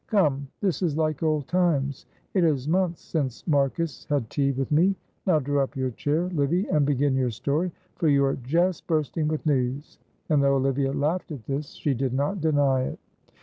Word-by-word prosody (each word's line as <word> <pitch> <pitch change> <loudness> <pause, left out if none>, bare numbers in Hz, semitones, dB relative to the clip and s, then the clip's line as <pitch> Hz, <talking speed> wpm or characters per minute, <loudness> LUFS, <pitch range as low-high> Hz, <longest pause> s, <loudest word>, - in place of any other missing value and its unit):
Come, 145 -9 +2
this 195 -4 0
is 160 -5 0
like 155 -2 0
old 155 -3 0
times. 150 -7 0 0.3
It 185 - +3
is 145 -5 +1
months 175 0 0
since 135 -7 -3
Marcus 150 +1 0
had 140 -7 -1
tea 140 -1 +1
with 135 +1 -3
me. 180 +6 +4 0.3
Now 175 -4 +5
draw 145 0 0
up 135 +2 -3
your 130 -1 -1
chair, 145 +7 0
Livy, 165 +5 +1
and 150 -2 +2
begin 145 -1 +2
your 130 -1 +1
story, 145 - -1 0.3
for 165 - +1
you 140 -2 +4
are 135 - 0
just 170 +8 0
bursting 155 -1 0
with 155 +1 -2
news," 135 0 -1 0.3
and, 150 -4 +3
though 140 0 +3
Olivia 135 0 +1
laughed 150 +6 -1
at 130 -8 -7
this, 140 +2 -4
she 145 - -1
did 130 0 -1
not 145 +8 -1
deny 140 -4 +2
it. - - -6
145 Hz, 190 wpm, -26 LUFS, 135-160 Hz, 0.3 s, Now